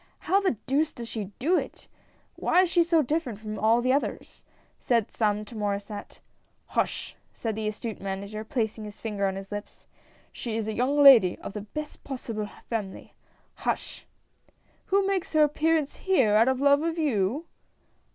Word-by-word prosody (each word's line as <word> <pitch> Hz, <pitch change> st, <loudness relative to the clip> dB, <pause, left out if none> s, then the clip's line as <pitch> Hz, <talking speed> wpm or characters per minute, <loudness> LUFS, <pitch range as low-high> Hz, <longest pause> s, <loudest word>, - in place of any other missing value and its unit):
" -, -, -42 dB
How 395 Hz, +1 st, +5 dB
the 375 Hz, -, +1 dB
deuce 290 Hz, +4 st, +1 dB
does 235 Hz, -1 st, -7 dB
she 220 Hz, -3 st, -4 dB
do 340 Hz, +8 st, +2 dB
it? -, -, -9 dB, 0.5 s
Why 365 Hz, -, +3 dB
is 355 Hz, -, -1 dB
she 350 Hz, -, +4 dB
so 330 Hz, -2 st, +3 dB
dif 310 Hz, +5 st, 0 dB
ferent 230 Hz, -5 st, -6 dB
from 215 Hz, 0 st, -6 dB
all 225 Hz, +2 st, +3 dB
the 255 Hz, +1 st, +3 dB
others? 280 Hz, -, -3 dB, 0.2 s
" -, -, -37 dB
said 230 Hz, -4 st, +1 dB
some 210 Hz, -1 st, 0 dB
to 230 Hz, -, -12 dB
Mauresset. 205 Hz, -1 st, -4 dB, 0.2 s
" -, -, -42 dB
Hush! -, -, -1 dB
" -, -, -39 dB
said 225 Hz, -2 st, -3 dB
the 215 Hz, 0 st, -3 dB
astute 215 Hz, +1 st, -5 dB
Manager, 200 Hz, +2 st, -4 dB
placing 220 Hz, -3 st, -2 dB
his 210 Hz, -1 st, -10 dB
finger 205 Hz, -3 st, -1 dB
on 190 Hz, -, -2 dB
his 195 Hz, +1 st, -8 dB
lips, 205 Hz, 0 st, -7 dB, 0.2 s
" -, -, -32 dB
she 225 Hz, -2 st, -4 dB
is 220 Hz, -1 st, -2 dB
a 220 Hz, -, -2 dB
young 275 Hz, +6 st, +2 dB
lady 230 Hz, -10 st, +8 dB
of -, -, -8 dB
the 210 Hz, -, -4 dB
best 300 Hz, +9 st, -7 dB
possible 230 Hz, -6 st, -5 dB, 0.2 s
family. 210 Hz, -5 st, -5 dB, 0.4 s
Hush! -, -, -3 dB, 0.4 s
" -, -, -37 dB
"Who 395 Hz, 0 st, +3 dB
makes 385 Hz, -4 st, -1 dB
her 310 Hz, -1 st, +6 dB
appearance 305 Hz, 0 st, +1 dB
here 265 Hz, -, +3 dB
out 220 Hz, +3 st, +5 dB
of 260 Hz, -1 st, +1 dB
love 285 Hz, +1 st, +5 dB
of 330 Hz, +1 st, -1 dB
you?" 270 Hz, -, 0 dB
230 Hz, 195 wpm, -27 LUFS, 210-295 Hz, 0.5 s, lady